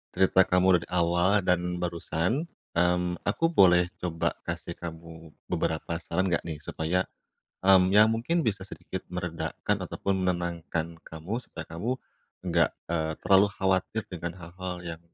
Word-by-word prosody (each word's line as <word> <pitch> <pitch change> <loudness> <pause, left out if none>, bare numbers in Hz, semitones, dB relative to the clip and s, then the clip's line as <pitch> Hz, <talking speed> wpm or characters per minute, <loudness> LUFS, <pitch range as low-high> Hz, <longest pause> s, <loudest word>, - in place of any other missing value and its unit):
cerita 95 0 +4
kamu 90 -1 +4
dari 85 - -10
awal 90 +3 +3
dan 90 0 +1
barusan, 90 - -1 0.2
mmm, 90 +1 +1
aku 165 +11 +2
boleh 90 - +5
coba 85 -2 -1 0.2
kasih 85 0 -4
kamu 80 -1 -9 0.2
beberapa 80 +1 -1
saran 90 +3 -1
enggak 85 - +1
nih 80 -2 -5
supaya, 90 +4 0 0.6
mmm, 95 -1 +6
ya 105 +2 +7
mungkin 120 +9 0
bisa 100 -3 0
sedikit 95 -1 -7
meredakan 90 -2 -2
ataupun 95 -1 -1
menenangkan 85 -2 -1 0.2
kamu 80 +6 -6
supaya - - -9
kamu 85 +9 -4 0.6
enggak, 85 -1 +3 0.2
eee, 80 -1 -1
terlalu 95 +1 +6
khawatir 95 +3 0
dengan 85 -2 -5
hal-hal 90 +1 -6
yang 80 -1 -6
90 Hz, 140 wpm, -28 LUFS, 85-95 Hz, 0.6 s, ya